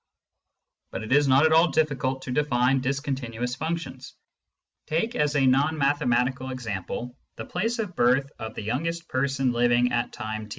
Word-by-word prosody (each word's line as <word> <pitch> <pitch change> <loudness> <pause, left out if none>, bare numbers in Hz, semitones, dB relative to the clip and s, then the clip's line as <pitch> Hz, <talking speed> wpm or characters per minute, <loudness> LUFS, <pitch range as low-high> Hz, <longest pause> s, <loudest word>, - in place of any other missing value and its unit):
But - - -6
it 110 - -7
is 145 0 +4
not 135 +3 +5
at 160 - +3
all 165 +2 +6
difficult 135 -5 0
to - - -5
define 130 -1 +2
discontinuous 130 -3 -3
functions. 160 -2 -5 0.7
Take, 195 +10 -1
as 150 0 +1
a 140 -2 +3
non 140 +5 +3
mathematical 130 -2 +1
example, 120 0 -5
" - - -53
the - - -6
place 230 +2 -2
of 205 -6 -4
birth 130 +2 +2
of 110 -1 -6
the - - -5
youngest 165 +10 -3
person 135 -1 0
living 120 +1 +2
at 120 0 -1
time 110 -1 -5
i." - - -16
130 Hz, 170 wpm, -25 LUFS, 120-150 Hz, 0.7 s, all